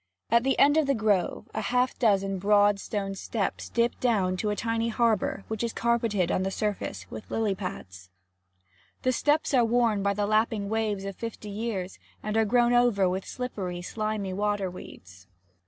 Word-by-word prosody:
At 235 0 +5
the 270 +2 +1
end 290 +2 +5
of 310 -3 +3
the 275 - +2
grove, 210 -5 0
half 250 +4 +1
a - - -32
dozen 195 -4 +2
broad 205 +1 +4
stone 195 -1 -3
steps 195 +1 -3
dip 235 0 0
down 200 -7 +1
to 210 - -1
a 210 - 0
tiny 230 +1 -1
harbour 220 -4 +1
which 220 0 -3
is 235 - -2
carpeted 230 -6 +1
on - - +1
the 190 - 0
surface 195 - -3
with 110 - -8
lily 220 -3 0
pads. 95 - -7 0.9
The 255 - +3
steps 295 +4 +1
are 250 -3 +5
worn 230 -3 +2
by 200 0 +1
the 205 0 0
lapping 215 -1 +1
waves 215 -3 -1
of 195 -1 -5
fifty 230 -2 -6
years, 200 -3 -4 0.2
and 215 0 -2
are 225 0 +3
grown 240 +2 +3
over 240 -6 +4
with 185 +1 -2
slippery, 190 -8 -4
slimy 215 -1 -3
water 205 -1 -1
weeds. 95 - -12
210 Hz, 180 wpm, -27 LUFS, 195-235 Hz, 0.9 s, At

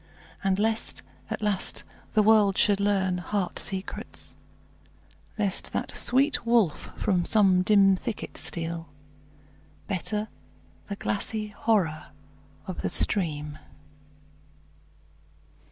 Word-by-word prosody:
And 190 -1 +2
lest, 220 +2 -1 0.3
at - - -4
last, 205 -3 +1 0.3
the 215 - +4
world 210 -2 +5
should 205 -1 +3
learn 190 -3 +1
heart 190 0 -2
secrets; 190 0 -4 1.0
Lest 200 -3 -1
that - - -2
sweet 275 +4 +2
wolf 230 -9 +2
from 185 -4 +1
some 190 -2 +4
dim 195 0 +5
thicket 210 +3 -5
steal; 165 -1 -2 1.0
Better 210 +2 -1 0.6
the 200 - -3
glassy 210 +2 -1
horror 190 -8 0 0.6
of - - -5
the - - -1
stream. 150 -7 -1
200 Hz, 100 wpm, -27 LUFS, 180-215 Hz, 1.0 s, world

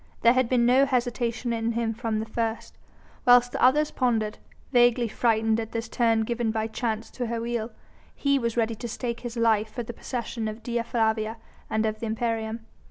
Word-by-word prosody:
There 235 +1 +6
had 255 -2 +2
been 245 -2 +3
no 260 +3 +5
hesitation 245 -1 -1
in 230 0 -1
him 230 -1 -1
from 225 -1 -2
the 220 - -3
first. 225 0 -3 0.5
Whilst 245 0 +6
the - - -3
others 295 +4 +4
pondered 225 -4 0 0.3
vaguely 240 -1 +4
frightened 225 0 +1
at 225 -1 -5
this 230 0 -3
turn 230 -2 +2
given 235 +1 -1
by 220 0 -1
Chance 225 0 -3
to 245 -2 -4
her 230 0 -2
wheel 230 -1 -2 0.5
he 280 -1 +2
was 235 -1 -2
ready 230 -1 +1
to 230 +2 -6
stake 235 +1 -4
his 240 -1 -6
life 220 -2 +2
for 240 +2 -4
the 240 - -7
possession 235 -3 -4
of 215 +1 -6
Dea 235 -1 -1
Flavia 220 -1 0 0.3
and 220 0 +1
of 215 0 -2
the 230 - -3
imperium. 225 0 -2
230 Hz, 195 wpm, -26 LUFS, 220-240 Hz, 0.5 s, There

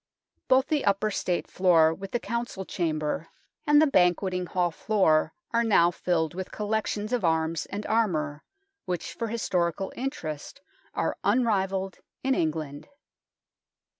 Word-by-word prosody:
Both 260 +1 +5
the 300 -1 0
upper 200 +2 +1
State 180 -3 -1
floor 165 -4 +4
with 195 +3 -8
the 240 - -1
Council 235 -4 -4
Chamber 155 -2 -2 0.4
and 295 0 +6
the 310 - +6
Banquet 185 - +3
THE 180 - -1
NORMAN 180 -1 -3
KEEP - - -18
37 - - -6
ing - - +4
Hall 175 - +1
floor 175 -5 +2 0.2
are 235 0 +3
now 175 -6 +4
filled 165 -3 0
with 185 +1 -4
the - - -12
collec 215 +1 -1
tions 210 +2 -3
of 245 - 0
arms 160 -1 +1
and 205 +1 -5
armour, 155 -10 0 0.4
which 180 -2 -3
for 230 - -3
historical 190 -4 -1
interest 245 - -5 0.4
are - - -1
unrivalled 195 -4 +1 0.2
in 265 0 +2
England. 155 - -2
190 Hz, 165 wpm, -27 LUFS, 165-220 Hz, 0.4 s, and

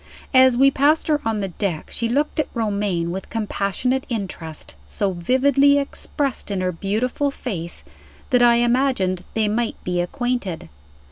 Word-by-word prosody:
As 260 -1 +6
we 275 +2 +6
passed 295 +4 +2
her 300 -1 +2
on 225 -2 -1
the 195 - -2
deck 175 -3 -3
she 230 0 -2
looked 290 +5 0
at 305 - +1
Romayne 200 -6 -1
with 190 +1 -6
compassionate 225 +4 -1
interest 185 - -5
so 195 - -1
vividly 275 +9 +3
expressed 280 -2 -2
in 200 -2 -2
her 185 0 0
beautiful 220 - -1
face 185 -11 -6 0.5
that 250 -1 +4
I 240 -1 +6
imagined 235 -7 +1
they 220 -1 +2
might 225 +2 -1
be 180 -1 0
acquainted. 200 - -3
225 Hz, 150 wpm, -22 LUFS, 190-260 Hz, 0.5 s, As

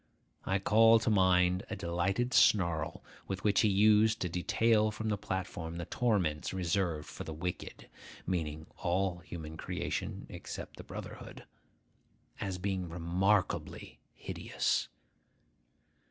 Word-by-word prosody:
I 95 - +2
call 115 +3 +6
to 110 0 0
mind 90 -1 +3
a - - -3
delighted 95 +9 -1
snarl 85 - +3 0.2
with 95 -1 -4
which 100 -1 +3
he 110 - +4
used 105 +2 +4
to 90 - -1
detail 110 +5 +2
from 110 +1 -4
the 105 - +1
platform 95 -4 -4
the 85 - -4
torments 95 -10 0
reserved 85 -4 -1
for - - -7
the 80 - -6
wicked 90 +3 -5 0.4
(meaning 80 -4 -2
all 90 0 0
human 80 -3 -8
creation - - -4
except - - -8
the - - -8
brotherhood), - - -9 1.0
as 95 -2 -3
being 95 -1 -2
remarkably 90 +4 0 0.2
hideous. - - -1
95 Hz, 125 wpm, -32 LUFS, 85-105 Hz, 1.0 s, call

